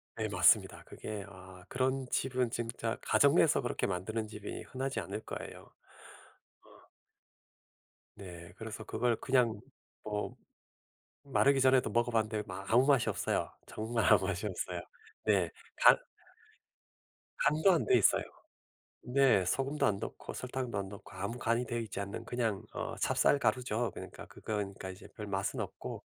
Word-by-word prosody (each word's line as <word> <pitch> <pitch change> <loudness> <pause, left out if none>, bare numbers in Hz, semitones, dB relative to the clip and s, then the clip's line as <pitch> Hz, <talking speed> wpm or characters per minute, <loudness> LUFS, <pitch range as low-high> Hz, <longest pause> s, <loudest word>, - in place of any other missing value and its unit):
네 - - -1
맞습니다. - - +4
그게 105 -2 -6
아 95 -1 -13
그런 130 +1 0
집은 125 -2 0
진짜 115 0 -3
가정 - - +4
내에서 - - +4
그렇게 - - -1
만드는 110 +4 -2
집이 105 -1 -7
흔하지 135 +1 -3
않을 - - -5
거예요. - - -7 0.9
어. - - -20 1.3
네 85 -3 -10
그래서 110 0 -6
그걸 115 +2 0
그냥 120 -5 +2 0.4
뭐 105 -1 -3 0.9
마르기 140 0 +3
전에도 130 -1 +4
먹어봤는데 110 -2 +1
마 95 0 -6
아무 125 +3 +5
맛이 140 -4 +4
없어요. - - -1 0.2
정말 115 +1 -1
아무 100 -3 +6
맛이 100 +1 -2
없어요. 95 - -3 0.5
네. 95 -6 +3 0.3
간 - - +8 1.4
간도 155 +6 +4
안 170 - +2
되어 - - +5
있어요. 105 - +4 0.8
네. 125 -6 +4
소금도 135 +10 0
안 100 -2 +1
넣고 - - -6
설탕도 125 -3 -4
안 100 -1 -3
넣고 100 0 -11
아무 100 +6 -4
간이 120 +1 +1
되어 120 - -2
있지 110 -4 -4
않는 100 +1 -5
그냥 115 -5 -1
어 - - -4
찹쌀 145 - +3
가루죠. 120 -4 0
그러니까 - - -9
그건 110 - -5 0.2
그러니까 95 - -7
이제 95 +2 -11
별 105 - -6
맛은 100 -1 -2
없고 - - -6
110 Hz, 300 characters per minute, -32 LUFS, 100-125 Hz, 1.4 s, 간